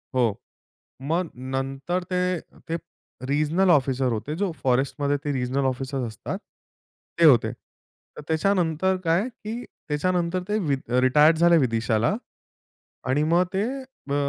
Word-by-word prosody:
हो. 120 Hz, -5 st, +3 dB, 0.8 s
मग 170 Hz, 0 st, 0 dB, 0.2 s
नंतर 135 Hz, +7 st, -2 dB
ते 180 Hz, -, +1 dB, 0.5 s
ते 165 Hz, -, -1 dB, 0.5 s
रिजनल 155 Hz, +6 st, +2 dB
ऑफिसर 130 Hz, -3 st, +2 dB
होते 120 Hz, +7 st, -3 dB
जो 195 Hz, -4 st, +1 dB
फॉरेस्टमध्ये 140 Hz, +3 st, +1 dB
ते 145 Hz, -, -1 dB
रिजनल 130 Hz, +1 st, -1 dB
ऑफिसर्स 130 Hz, 0 st, -3 dB
असतात, 110 Hz, -2 st, -5 dB, 0.8 s
ते 170 Hz, -, +6 dB
होते. 120 Hz, -6 st, +6 dB, 0.6 s
तर -, -, -8 dB
त्याच्यानंतर 180 Hz, +1 st, +1 dB
काय, 170 Hz, +6 st, +2 dB, 0.2 s
की 225 Hz, +3 st, -4 dB
त्याच्यानंतर 175 Hz, +3 st, -1 dB
ते 210 Hz, -, +1 dB
वि 140 Hz, -2 st, +2 dB, 0.3 s
रिटायर्ड 150 Hz, +5 st, +5 dB
झाले 170 Hz, +1 st, +5 dB
विदिशाला. 115 Hz, -, +1 dB, 0.9 s
आणि 145 Hz, +3 st, +2 dB
मग 180 Hz, +1 st, +4 dB
ते 195 Hz, +2 st, +1 dB, 0.5 s
अ, -, -, +2 dB
150 Hz, 125 wpm, -25 LUFS, 130-175 Hz, 0.9 s, ते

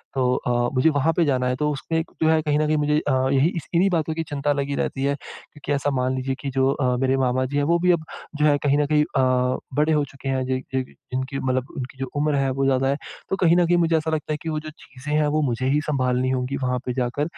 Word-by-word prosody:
तो 125 Hz, -1 st, +2 dB
अ, 120 Hz, 0 st, 0 dB
मुझे 130 Hz, +5 st, +4 dB
वहाँ 160 Hz, +4 st, +2 dB
पे 170 Hz, -, +4 dB
जाना 130 Hz, -3 st, +1 dB
है। 125 Hz, -, 0 dB
तो 150 Hz, +3 st, 0 dB
उसमें 160 Hz, +3 st, -2 dB, 0.2 s
जो 160 Hz, -, +4 dB
है 160 Hz, 0 st, +3 dB
कहीं 150 Hz, -1 st, +1 dB
न 155 Hz, -, +2 dB
कहीं 155 Hz, -, +2 dB
मुझे 150 Hz, 0 st, +2 dB
अ, 145 Hz, -, -2 dB, 0.2 s
यही 140 Hz, +5 st, +4 dB
इस 165 Hz, -, -6 dB
इन्हीं 185 Hz, +4 st, +4 dB
बातों 160 Hz, -3 st, 0 dB
की 165 Hz, +1 st, -2 dB
चिंता 145 Hz, 0 st, 0 dB
लगी 140 Hz, 0 st, -2 dB
रहती 135 Hz, -, -2 dB
है। 140 Hz, +1 st, +1 dB
क्योंकि 145 Hz, +1 st, -10 dB
ऐसा 145 Hz, +1 st, 0 dB
मान 130 Hz, 0 st, 0 dB
लीजिए 130 Hz, +1 st, -2 dB
कि 140 Hz, -, -3 dB
जो 135 Hz, 0 st, +3 dB
अ, 130 Hz, -3 st, 0 dB
मेरे 135 Hz, +1 st, +1 dB
मामा 130 Hz, 0 st, +1 dB
जी 140 Hz, +3 st, -3 dB
है 145 Hz, -, +2 dB
वो 170 Hz, -, +3 dB
भी 180 Hz, +1 st, +3 dB
अब 170 Hz, -2 st, +1 dB, 0.3 s
जो 150 Hz, 0 st, +2 dB
है 145 Hz, -1 st, +4 dB
कहीं 145 Hz, 0 st, +3 dB
न 150 Hz, -, +2 dB
कहीं 150 Hz, 0 st, +3 dB
अ, 130 Hz, -2 st, +1 dB, 0.2 s
बड़े 150 Hz, +2 st, +3 dB
हो 150 Hz, -, +2 dB
चुके 135 Hz, 0 st, -8 dB
हैं 130 Hz, -1 st, 0 dB
ज 130 Hz, 0 st, -1 dB
ज 130 Hz, -, +1 dB, 0.3 s
जिनकी 130 Hz, +1 st, -2 dB
मतलब 130 Hz, 0 st, -1 dB
उनकी 130 Hz, -1 st, -6 dB
जो 135 Hz, -, -3 dB
उम्र 150 Hz, 0 st, +1 dB
है 135 Hz, -1 st, +1 dB
वो 135 Hz, +1 st, 0 dB
ज़्यादा 135 Hz, 0 st, +2 dB
है। 140 Hz, -, +1 dB, 0.3 s
तो -, -, +1 dB
कहीं 170 Hz, -2 st, +4 dB
न 175 Hz, -, +4 dB
कहीं 175 Hz, -, +3 dB
मुझे 165 Hz, -1 st, +2 dB
ऐसा 160 Hz, 0 st, -2 dB
लगता 155 Hz, 0 st, -2 dB
है 150 Hz, -, -2 dB
कि 165 Hz, -, -4 dB
वो 155 Hz, -, -1 dB
जो 155 Hz, 0 st, -8 dB
चीज़े 145 Hz, -1 st, -10 dB
हैं 150 Hz, -, +2 dB
वो 155 Hz, +1 st, +1 dB
मुझे 130 Hz, -3 st, -1 dB
ही 145 Hz, +2 st, +3 dB
संभालनी 130 Hz, -3 st, +1 dB
होंगी 130 Hz, +1 st, -1 dB
वहाँ 125 Hz, 0 st, 0 dB
पे 125 Hz, -, -2 dB
जाकर। 125 Hz, +2 st, -1 dB
140 Hz, 280 wpm, -23 LUFS, 130-150 Hz, 0.3 s, मुझे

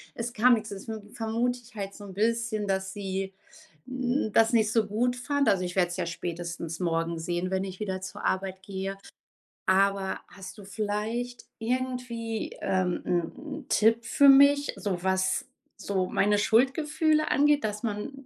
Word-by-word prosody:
es 240 Hz, +1 st, -4 dB
kam 245 Hz, +3 st, +5 dB
nix. 215 Hz, -1 st, -5 dB
Deswegen 210 Hz, +1 st, -7 dB
vermute 235 Hz, +2 st, -1 dB
ich 235 Hz, 0 st, -19 dB
halt 200 Hz, -1 st, -4 dB
so 205 Hz, -, -11 dB
'n 195 Hz, -, -9 dB
bisschen, 220 Hz, 0 st, 0 dB
dass 190 Hz, 0 st, -1 dB
sie, 195 Hz, -1 st, -3 dB, 0.5 s
hm, 255 Hz, -2 st, -1 dB
das 225 Hz, +1 st, +4 dB
nicht 220 Hz, -2 st, +3 dB
so 225 Hz, -2 st, +3 dB
gut 245 Hz, +4 st, 0 dB
fand. 280 Hz, +3 st, +1 dB
Also, 190 Hz, -2 st, +2 dB
ich 180 Hz, 0 st, -4 dB
werde 180 Hz, -2 st, +3 dB
es 175 Hz, -, -5 dB
ja 180 Hz, -, -1 dB
spätestens 170 Hz, -1 st, -5 dB
morgen 165 Hz, -1 st, 0 dB
sehen, 175 Hz, +2 st, -2 dB
wenn 190 Hz, 0 st, 0 dB
ich 190 Hz, -1 st, -7 dB
wieder 190 Hz, -3 st, -3 dB
zur 185 Hz, -, -7 dB
Arbeit 190 Hz, 0 st, -1 dB
gehe. 195 Hz, 0 st, -4 dB, 0.7 s
Aber 195 Hz, 0 st, +2 dB
hast 190 Hz, 0 st, -10 dB
du 205 Hz, -, -10 dB
vielleicht 215 Hz, +4 st, -3 dB
irgendwie, 245 Hz, -2 st, -2 dB
ähm, 185 Hz, -2 st, 0 dB
'n 175 Hz, -2 st, 0 dB, 0.3 s
'n -, -, -21 dB
Tipp 225 Hz, +2 st, +3 dB
für 280 Hz, +4 st, +5 dB
mich, 280 Hz, +1 st, +6 dB
so 185 Hz, -4 st, -3 dB
was 190 Hz, +3 st, +1 dB, 0.3 s
so 190 Hz, -2 st, -1 dB
meine 205 Hz, +1 st, +2 dB
Schuldgefühle 295 Hz, +7 st, +2 dB
angeht, 295 Hz, +1 st, +4 dB
dass 210 Hz, 0 st, -2 dB
man 215 Hz, +4 st, -3 dB
210 Hz, 170 wpm, -28 LUFS, 190-240 Hz, 0.7 s, mich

